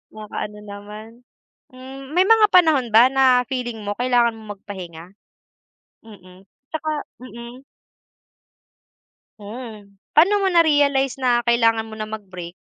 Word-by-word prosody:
Makaano 210 -1 -7
naman. 210 +3 -12 0.5
Hmm, 265 +2 -11
may 365 +2 +3
mga 445 -1 +6
panahon 310 -9 +4
ba 230 +3 +7
na 260 -2 +3
feeling 245 -4 -4
mo 205 - -2
kailangan 240 -2 +1
mong 210 -2 -10
magpahinga? 175 -4 -10 1.0
Mm, 190 -3 -17 0.2
'tsaka 315 0 -4 0.3
mm. 240 +1 -11 1.8
Mm. 210 -2 -10 0.2
Pa'no 395 +6 +4
mo 385 - +2
na-realize 290 -6 +2
na 245 -1 +3
kailangan 230 -1 +2
mo 220 - -10
nang 215 0 -7
mag 215 -2 -7
break? 180 -1 -10
235 Hz, 125 wpm, -21 LUFS, 210-270 Hz, 1.8 s, ba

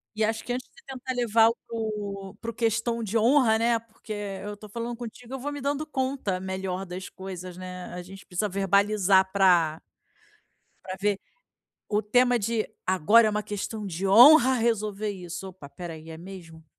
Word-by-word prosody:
E 215 - 0
acho 220 +1 0
que, 245 - -3
antes 255 +1 -5
de - - -21
tentar 260 -1 -5
levar 230 -2 +4
o 230 - -2
co 205 -3 -5
para 230 - -4
o - - -16
"questão 230 0 0
de 220 +2 -1
honra", 230 -1 +4
né, 235 0 +3
porque 225 0 -14 0.3
eu 205 0 -5
estou 210 +1 -12
falando 235 +2 -4
contigo, 240 +1 -9
eu 270 - -4
vou 290 +3 -4
me 290 - -6
dando 285 +3 -1
conta, 260 -9 -2
melhor, 190 0 -4
das 185 +1 -7
coisas, 185 -1 -8
né, 180 -1 -7
a 180 - -5
gente 195 +2 -12
precisa 200 +3 -2
verbalizar 195 0 +3
pra 175 -5 +4 1.1
pra 185 0 -5
ver, 205 -1 +1 0.7
o 210 0 +1
tema 245 +3 +3
de: 225 0 -1 0.2
"Agora 195 +5 +5
é - - +2
uma 210 0 -1
questão 210 +1 -5
de 190 +1 -3
honra 255 +5 +8
resolver 215 -3 0
isso!". 180 0 -7
"Opa, 180 -6 -12
espera 170 +3 -8
aí, 160 +1 -11
é 160 - -7
mesmo?". 170 -3 -11
210 Hz, 185 wpm, -26 LUFS, 190-230 Hz, 1.1 s, honra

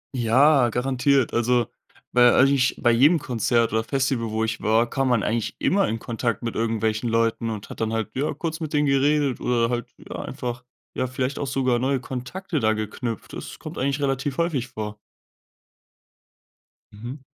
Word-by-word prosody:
Ja, 130 +3 +4
garantiert. 130 +2 +1
Also, 120 0 +2 0.5
bei 120 0 +6
eigentlich 135 0 +4
bei 120 - +3
jedem 145 +9 +5
Konzert 115 -3 0
oder 110 - +1
Festival, 130 -1 -1
wo 110 +1 -1
ich 115 0 -2
war, 115 +2 +3
kam 135 +1 -1
man 115 -4 +2
eigentlich 115 0 -1
immer 195 0 +2
in 115 - -2
Kontakt 115 +1 -3
mit 115 - -2
irgendwelchen 110 0 -1
Leuten 115 0 +1
und 105 -2 -6
hat - - -8
dann 110 - 0
halt, 110 -1 -2
ja, 140 +3 0
kurz 160 +2 -4
mit 155 -2 -5
denen 150 0 +3
geredet 140 -1 +2
oder 120 -1 +1
halt, 120 -1 -3
ja, - - -9
einfach, 125 0 -5 0.3
ja, 130 - -1
vielleicht 130 +2 -3
auch 140 - -2
sogar 130 -2 +1
neue 135 +2 +1
Kontakte 135 +7 -4
da 110 -1 +2
geknüpft. 110 +1 -5
Das - - -7
kommt - - -8
eigentlich 140 +2 0
relativ 135 0 -1
häufig 155 -7 0
vor. 110 -3 -6 2.0
Mhm. 120 +6 -8
125 Hz, 175 wpm, -24 LUFS, 115-135 Hz, 2.0 s, bei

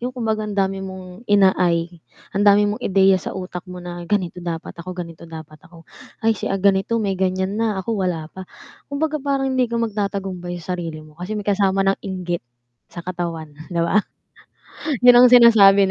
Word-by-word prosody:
yung 245 - -2
kumbaga 220 -3 -1
ang 205 - -5
dami 195 0 0
mong 190 +3 -9
ina-ay 180 -4 +2 0.3
ang 200 - 0
dami 205 +1 +5
mong 205 +1 -2
ideya 190 -1 +3
sa - - -6
utak 180 -1 -6
mo 180 - -8
na, 175 0 -7
"Ganito 180 -4 -1
dapat 170 -2 -5
ako, 180 +1 -8
ganito 170 -1 -8
dapat 155 -2 -11
ako. 165 -1 -17 0.4
Ay 225 - +4
si 215 - -4
ganito, 195 +3 +1
may 210 -4 0
ganyan 190 +2 -1
na 220 -3 0
ako 190 +4 -3
wala 180 -6 -1
pa." 190 -1 -10 0.4
Kumbaga 305 +1 -2
parang 270 -1 -1
hindi 255 -2 +1
ka 235 - -3
magtatagumbay 195 -5 -3
sa 185 - -3
sarili 165 -3 -6
mo 155 - -17
kasi 200 +4 -4
may 205 - -5
kasama 195 -1 +1
ng 195 0 +1
inggit 180 -3 -4 0.5
sa 170 - -9
katawan, 170 -4 -5 0.2
'di 170 -3 -2
ba, 195 +5 +3 1.0
yun 245 0 +8
ang 250 - +9
sinasabi 200 -5 +7
190 Hz, 185 wpm, -21 LUFS, 175-210 Hz, 1.0 s, ang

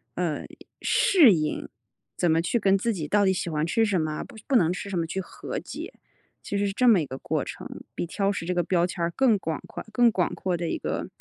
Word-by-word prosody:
呃 - - -1 0.4
适 310 - +5
应， 155 -3 -2 0.5
怎 175 - +2
么 160 +1 +3
去 180 +8 0
跟 195 -1 +3
自 230 +4 0
己 160 -6 -4
到 205 +5 +3
底 190 - +4
喜 180 -2 -3
欢 155 -1 0
吃 225 +7 +2
什 205 -3 +1
么， 155 -1 -2
不 - - -14
不 275 - 0
能 170 -8 +4
吃 195 +2 -5
什 185 -3 -1
么 165 - -1
去 190 - -3
和 - - -7
解， - - -7 0.5
其 200 - -3
实 200 0 +1
是 195 - -3
这 250 +5 +2
么 220 -6 +7
一 - - -2
个 130 -1 -7
过 - - -2
程。 - - -7 0.3
比 - - -2
挑 195 +3 -1
食 190 - -4
这 180 - -1
个 175 - +2
标 175 0 +2
签 175 0 -5
儿 170 - +1
更 245 -6 +4
广 160 -4 -3
夸 - - -7
更 235 +2 +4
广 180 -5 0
阔 185 -2 -1
的 170 0 -3
一 - - -1
个 - - -3
185 Hz, 275 characters per minute, -26 LUFS, 165-205 Hz, 0.5 s, 么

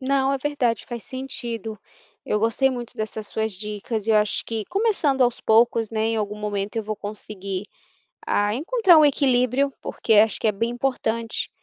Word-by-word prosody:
Não, 270 0 +1
é 275 - 0
verdade, 255 -5 -1
faz 240 -2 -6
sentido, 235 -5 -5 0.5
eu 210 - +1
gostei 230 +5 +2
muito 245 -2 -6
dessas 215 -1 -3
suas 220 0 -2
dicas 210 +2 -4
e - - +1
eu 215 - +5
acho 210 -1 +1
que 225 -2 -4
começando 350 - +1
aos 245 -1 +1
poucos, 225 0 +3
né, 220 0 0
em 225 - 0
algum 210 -1 -2
momento 205 0 -3
eu 225 - 0
vou 215 0 -4
conseguir, 200 -2 -4 0.6
ah, 205 0 +1
encontrar 355 - +4
um 305 - +6
equilíbrio, 265 -1 +2
porque 225 - 0
acho 215 +1 +4
que - - 0
é - - +2
bem 230 +4 -1
importante 235 -2 -2
230 Hz, 180 wpm, -23 LUFS, 215-265 Hz, 0.6 s, um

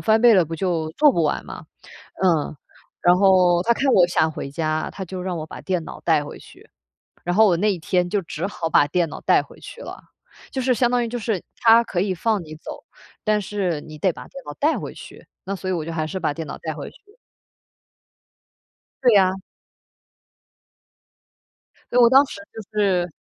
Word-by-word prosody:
翻 220 -1 +3
倍 235 -1 +7
了 185 -3 +5
不 165 +1 -6
就 165 -2 -1
做 295 - +4
不 170 - +1
完 150 - -1
嘛？ - - -10 0.6
嗯， 165 -5 +1 0.5
然 175 0 +5
后 185 -2 +4
他 235 - +3
看 270 +2 +1
我 180 -5 +6
想 160 -2 +1
回 140 - -6
家， 155 +1 -2
他 190 - -6
就 185 +1 -7
让 180 -1 -3
我 155 - -5
把 - - -10
电 185 -3 -2
脑 - - -9
带 155 -3 +2
回 145 - -9
去， - - -17 0.5
然 175 0 -1
后 220 +1 +6
我 175 -4 +3
那 210 +4 +2
一 180 - -7
天 180 +2 0
就 205 +1 0
只 165 0 -5
好 170 -5 -4
把 145 - +5
电 170 +2 0
脑 - - -8
带 - - +4
回 - - -17
去 - - -11
了， - - -9 0.5
就 265 - -2
是 255 0 +2
相 245 0 +2
当 245 -1 +2
于 - - -4
就 245 - -4
是， 215 -5 -2
他 230 0 +6
可 185 - -3
以 195 -1 0
放 210 +1 0
你 155 -1 -10
走， 155 - -10 0.4
但 215 -1 +1
是 185 -6 -2
你 155 0 -11
得 185 +4 +1
把 - - -11
电 275 - -11
脑 145 - -7
带 305 +3 +2
回 - - -6
去， - - -13 0.2
那 195 +1 -3
所 185 0 -5
以 - - 0
我 165 -3 -2
就 165 - -5
还 155 -1 -2
是 190 +4 -4
把 150 - -1
电 160 0 -6
脑 - - -6
带 160 - -4
回 145 -1 -7
去。 410 +2 -23 1.9
对 245 - +6
呀。 190 -2 +4 2.6
所 245 - +2
以 - - +7
我 235 - +8
当 270 +2 +7
时 200 - -9
就 220 - -8 0.2
是 180 -3 +1
185 Hz, 230 characters per minute, -22 LUFS, 165-220 Hz, 2.6 s, 我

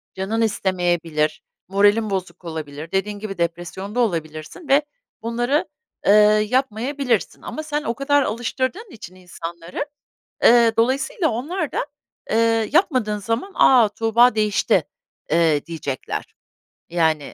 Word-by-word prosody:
canın 200 +4 -2
istemeyebilir, 175 -7 0 0.3
moralin 205 +3 +3
bozuk 185 -2 -4
olabilir, 155 -1 -6
dediğin 205 +2 -1
gibi 200 -2 -6
depresyonda 175 +6 -3
olabilirsin 160 - -3
ve 275 +2 +5 0.4
bunları, 240 +7 0 0.4
ııı, 210 +1 +6
yapmayabilirsin. 255 +3 -1
Ama 310 - -6
sen 300 -1 -2
o 230 - -1
kadar 285 +3 +2
alıştırdığın 260 - -3
için 195 - -11
insanları, 170 +4 -7 0.6
ııı, 230 -1 +6
dolayısıyla 265 - +1
onlar 300 +7 -3
da, - - -1 0.5
ııı, 225 -1 +2
yapmadığın 255 - +2
zaman 230 - -3
"A! 245 -5 +6
Tuğba 230 +3 +3
değişti," 215 -2 +2 0.5
eee, 160 -3 +2
diyecekler. 155 -6 -5 0.6
Yani, 160 -4 0
215 Hz, 115 wpm, -21 LUFS, 175-250 Hz, 0.6 s, ııı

